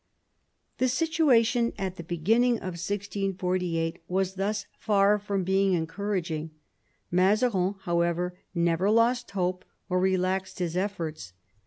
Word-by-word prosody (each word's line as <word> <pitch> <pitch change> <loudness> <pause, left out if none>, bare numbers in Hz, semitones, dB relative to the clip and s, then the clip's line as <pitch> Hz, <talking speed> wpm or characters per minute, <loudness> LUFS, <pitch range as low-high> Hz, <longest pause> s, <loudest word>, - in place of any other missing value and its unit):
The 255 - +3
situation 250 -6 +2
at 190 -2 -3
the 170 - -6
beginning 220 +9 +2
of 185 -5 -5
1648 185 -4 -2
was 190 +1 0
thus 205 +2 -2
far 205 -1 +3
from 200 -2 -2
being 190 +1 +2
encouraging. 165 -2 -2 0.6
Mazarin, 195 +1 +2
however, 175 0 0 0.2
never 170 +3 +2
lost 235 +3 +3
hope 185 -1 -2 0.3
or 185 0 +2
relaxed 190 0 0
his 175 -2 -2
efforts. 165 - -3
190 Hz, 115 wpm, -27 LUFS, 180-210 Hz, 0.6 s, The